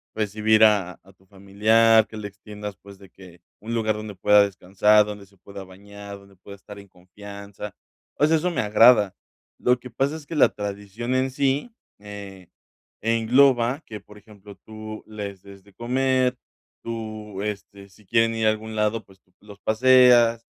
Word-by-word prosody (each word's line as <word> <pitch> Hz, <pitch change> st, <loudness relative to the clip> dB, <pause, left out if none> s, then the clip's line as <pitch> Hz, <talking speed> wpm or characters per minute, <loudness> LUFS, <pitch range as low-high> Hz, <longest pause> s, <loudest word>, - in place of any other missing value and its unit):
recibir 110 Hz, +1 st, +2 dB
a 100 Hz, -4 st, +2 dB
a 95 Hz, +1 st, -20 dB
tu 95 Hz, -, -30 dB
familiar, 110 Hz, +3 st, +3 dB
que 110 Hz, -, -13 dB
le 105 Hz, -1 st, -6 dB
extiendas, 105 Hz, +1 st, -10 dB
pues, 100 Hz, 0 st, -16 dB
de 95 Hz, -2 st, -16 dB
que 90 Hz, -2 st, -17 dB, 0.2 s
un 115 Hz, +2 st, -7 dB
lugar 110 Hz, -2 st, 0 dB
donde 105 Hz, -2 st, -8 dB
pueda 105 Hz, +2 st, +5 dB
descansar, 100 Hz, +2 st, +2 dB
donde 105 Hz, -1 st, -8 dB
se 100 Hz, 0 st, -27 dB
pueda 100 Hz, +1 st, -11 dB
bañar, 100 Hz, +1 st, -12 dB
donde 100 Hz, 0 st, -20 dB
pueda 100 Hz, +2 st, -13 dB
estar 100 Hz, +1 st, -13 dB
en 100 Hz, -, -14 dB
confianza. 100 Hz, +2 st, -11 dB, 0.4 s
O 150 Hz, -, +2 dB
sea, 160 Hz, 0 st, +3 dB
eso 180 Hz, +3 st, -1 dB
me -, -, -1 dB
agrada. 105 Hz, -1 st, +4 dB, 0.4 s
Lo 125 Hz, 0 st, +1 dB
que 125 Hz, -, -11 dB
pasa 135 Hz, +6 st, -2 dB
es 155 Hz, -, -10 dB
que 165 Hz, -, -7 dB
la 150 Hz, -, +5 dB
tradición 105 Hz, +4 st, -5 dB
en 130 Hz, 0 st, 0 dB
sí, 140 Hz, -, -1 dB, 0.3 s
eh, 100 Hz, -3 st, -11 dB, 0.5 s
engloba 120 Hz, +4 st, +2 dB
que, 105 Hz, -2 st, -9 dB
por 105 Hz, +2 st, -17 dB
ejemplo, 105 Hz, -1 st, -15 dB
tú 110 Hz, +1 st, -10 dB
les 100 Hz, -3 st, -8 dB
des 100 Hz, -1 st, -15 dB
de 100 Hz, -1 st, -22 dB
comer, 130 Hz, +1 st, 0 dB, 0.5 s
tú 110 Hz, -3 st, -7 dB
este, 100 Hz, -1 st, -7 dB
si 100 Hz, +2 st, -23 dB
quieren 115 Hz, +1 st, +1 dB
ir 110 Hz, -1 st, -1 dB
a -, -, +6 dB
algún 110 Hz, 0 st, -7 dB
lado, 105 Hz, +1 st, -1 dB
pues, 95 Hz, -1 st, -22 dB
tú 90 Hz, -, -39 dB
los 105 Hz, -1 st, -14 dB
paseas. 120 Hz, 0 st, +4 dB
105 Hz, 180 wpm, -23 LUFS, 100-115 Hz, 0.5 s, a